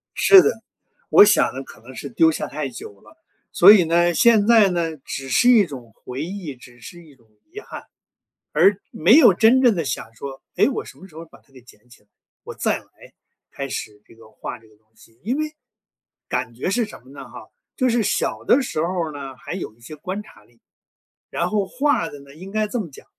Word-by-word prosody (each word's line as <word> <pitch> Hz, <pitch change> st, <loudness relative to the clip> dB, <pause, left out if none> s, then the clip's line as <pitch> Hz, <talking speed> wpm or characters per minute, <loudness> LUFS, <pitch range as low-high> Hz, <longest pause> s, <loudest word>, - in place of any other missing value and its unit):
是 385 Hz, -2 st, +7 dB
的， 445 Hz, -, -1 dB, 0.5 s
我 205 Hz, -, +8 dB
想 205 Hz, -9 st, +2 dB
呢 135 Hz, -, -6 dB
可 -, -, -15 dB
能 130 Hz, +2 st, -14 dB
是 140 Hz, -, -7 dB
丢 160 Hz, +6 st, +3 dB
下 -, -, -4 dB
太 145 Hz, -2 st, -5 dB
久 100 Hz, -4 st, -11 dB
了。 -, -, -20 dB, 0.4 s
所 -, -, +8 dB
以 190 Hz, -5 st, +5 dB
呢， 170 Hz, +1 st, +2 dB
现 220 Hz, +1 st, +4 dB
在 220 Hz, -4 st, +5 dB
呢 165 Hz, -3 st, -2 dB
只 135 Hz, 0 st, -8 dB
是 245 Hz, -, +3 dB
一 220 Hz, -6 st, +6 dB
种 125 Hz, -7 st, -11 dB
回 130 Hz, +4 st, -7 dB
忆， 175 Hz, -6 st, -7 dB
只 120 Hz, 0 st, -17 dB
是 175 Hz, +6 st, -12 dB
一 150 Hz, -4 st, -19 dB
种 115 Hz, -3 st, -29 dB, 0.2 s
遗 420 Hz, -, -8 dB
憾， -, -, -10 dB, 0.7 s
而 200 Hz, 0 st, +3 dB
没 175 Hz, +8 st, +2 dB
有 235 Hz, -, +7 dB
真 235 Hz, +6 st, +4 dB
正 240 Hz, -5 st, +4 dB
地 165 Hz, -3 st, -2 dB
想 115 Hz, -4 st, -5 dB
说， 135 Hz, +2 st, -9 dB
诶， -, -, +3 dB
我 270 Hz, -, -4 dB
什 -, -, -14 dB
么 190 Hz, -, -13 dB
时 160 Hz, -, -21 dB
候 165 Hz, +1 st, -9 dB
把 -, -, -20 dB
它 135 Hz, -, -32 dB
给 130 Hz, -, -15 dB
捡 120 Hz, -1 st, -21 dB
起 120 Hz, -, -19 dB
来， 105 Hz, -, -38 dB, 0.4 s
我 -, -, -8 dB
再 -, -, -1 dB
来， -, -, -19 dB, 0.7 s
开 140 Hz, 0 st, -6 dB
始 105 Hz, -4 st, -7 dB
这 -, -, -19 dB
个 115 Hz, -1 st, -18 dB
画 115 Hz, +2 st, -8 dB
这 110 Hz, -, -23 dB
个 110 Hz, -1 st, -24 dB
东 110 Hz, +1 st, -39 dB
西。 115 Hz, +1 st, -23 dB
因 245 Hz, +7 st, -2 dB
为， 310 Hz, 0 st, -3 dB, 0.8 s
感 125 Hz, -2 st, -3 dB
觉 130 Hz, +10 st, -3 dB
是 235 Hz, +2 st, 0 dB
什 210 Hz, -, -13 dB
么 130 Hz, -, -18 dB
呢 140 Hz, -1 st, -11 dB
哈？ -, -, -12 dB, 0.3 s
就 255 Hz, -3 st, +1 dB
是 235 Hz, -1 st, +1 dB
小 -, -, -2 dB
的 270 Hz, +2 st, +3 dB
时 155 Hz, -10 st, -4 dB
候 170 Hz, -2 st, -2 dB
儿 -, -, -9 dB
呢， 135 Hz, -2 st, -9 dB
还 -, -, -9 dB
有 180 Hz, -, -6 dB
一 120 Hz, -, -30 dB
些 115 Hz, +6 st, -11 dB
观 185 Hz, +7 st, -6 dB
察 -, -, -19 dB
力， 120 Hz, -1 st, -29 dB, 0.7 s
然 175 Hz, +1 st, -2 dB
后 205 Hz, -2 st, 0 dB
画 255 Hz, -, 0 dB
的 145 Hz, -, -12 dB
呢 140 Hz, 0 st, -16 dB
应 185 Hz, +5 st, -11 dB
该 215 Hz, 0 st, -1 dB
这 235 Hz, +3 st, -3 dB
么 175 Hz, -7 st, -5 dB
讲， 135 Hz, -, -15 dB
165 Hz, 250 characters per minute, -21 LUFS, 130-210 Hz, 0.8 s, 我